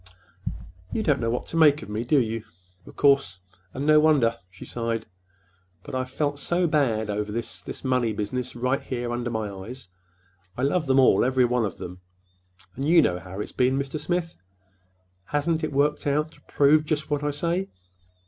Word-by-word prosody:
"You 220 Hz, -, -1 dB
don't 145 Hz, -7 st, +2 dB
know 115 Hz, -1 st, 0 dB
what 120 Hz, -, -2 dB
to 165 Hz, -, -1 dB
think 150 Hz, -2 st, +5 dB
of -, -, -10 dB
me, 105 Hz, +2 st, -2 dB, 0.9 s
of -, -, -12 dB
course; 140 Hz, -11 st, +3 dB, 0.3 s
and 135 Hz, +7 st, -4 dB
no 155 Hz, 0 st, +6 dB
wonder," 145 Hz, -7 st, +4 dB
she 90 Hz, -, -12 dB
sighed. 115 Hz, -1 st, -3 dB, 0.8 s
"But -, -, -10 dB
I've 130 Hz, 0 st, -2 dB
felt 145 Hz, +1 st, -1 dB
so 175 Hz, +4 st, +1 dB
bad 120 Hz, -9 st, +1 dB
over 105 Hz, 0 st, -2 dB
this—this 115 Hz, +2 st, -5 dB
money 125 Hz, -3 st, +1 dB
business 120 Hz, +5 st, -3 dB
right 125 Hz, +3 st, 0 dB
here 120 Hz, -2 st, -4 dB
under 120 Hz, 0 st, -2 dB
my 110 Hz, -2 st, -2 dB
eyes. 100 Hz, +4 st, -9 dB, 0.7 s
I 125 Hz, -, -2 dB
love 155 Hz, +3 st, +1 dB
them 135 Hz, 0 st, +4 dB
all, 130 Hz, -, +5 dB
every 130 Hz, 0 st, +3 dB
one 120 Hz, -1 st, +1 dB
of 100 Hz, -, -5 dB
them. 90 Hz, +1 st, -8 dB, 0.7 s
And 135 Hz, +4 st, -2 dB
you 170 Hz, -1 st, +7 dB
know 90 Hz, 0 st, 0 dB
how 90 Hz, +3 st, -7 dB
it's -, -, -6 dB
been, 130 Hz, +1 st, +2 dB
Mr. 140 Hz, +2 st, -3 dB
Smith. 175 Hz, 0 st, -2 dB, 0.9 s
Hasn't 155 Hz, +5 st, 0 dB
it 155 Hz, -, -1 dB
worked 145 Hz, +2 st, +1 dB
out 150 Hz, +2 st, +1 dB
to -, -, -20 dB
prove 150 Hz, +2 st, +4 dB
just 155 Hz, 0 st, -2 dB
what 145 Hz, -1 st, +1 dB
I 145 Hz, -, +1 dB
say? 170 Hz, +6 st, -1 dB
130 Hz, 180 wpm, -25 LUFS, 115-150 Hz, 0.9 s, you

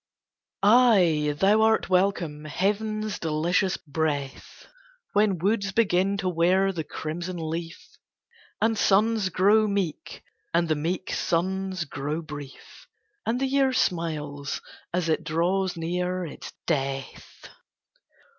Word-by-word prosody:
Ay, 195 Hz, -10 st, +5 dB
thou 205 Hz, +5 st, +4 dB
art 220 Hz, 0 st, +3 dB
welcome, 180 Hz, -5 st, 0 dB
heaven's 210 Hz, +6 st, -1 dB
delicious 170 Hz, +4 st, 0 dB
breath, 145 Hz, -2 st, -4 dB, 0.5 s
When 205 Hz, -2 st, +3 dB
woods 200 Hz, +2 st, 0 dB
begin 195 Hz, -2 st, +2 dB
to 195 Hz, -2 st, -2 dB
wear 185 Hz, +3 st, +2 dB
the 165 Hz, -4 st, -4 dB
crimson 170 Hz, +4 st, -5 dB
leaf, 165 Hz, -, -6 dB, 0.6 s
And 225 Hz, +1 st, +2 dB
suns 210 Hz, 0 st, +3 dB
grow 205 Hz, +5 st, +4 dB
meek, 195 Hz, -6 st, -3 dB, 0.3 s
and 170 Hz, 0 st, +3 dB
the 155 Hz, -, +1 dB
meek 170 Hz, +5 st, -3 dB
suns 185 Hz, +1 st, -1 dB
grow 145 Hz, +2 st, -3 dB
brief, 150 Hz, -, -10 dB, 0.4 s
And 235 Hz, +2 st, +1 dB
the 270 Hz, -, +1 dB
year 270 Hz, 0 st, +2 dB
smiles 150 Hz, -, -1 dB, 0.3 s
as 175 Hz, -1 st, -1 dB
it 160 Hz, 0 st, 0 dB
draws 175 Hz, +4 st, 0 dB
near 180 Hz, +2 st, -2 dB
its 155 Hz, -, -9 dB
death. 135 Hz, -3 st, -4 dB
180 Hz, 115 wpm, -26 LUFS, 160-200 Hz, 0.6 s, Ay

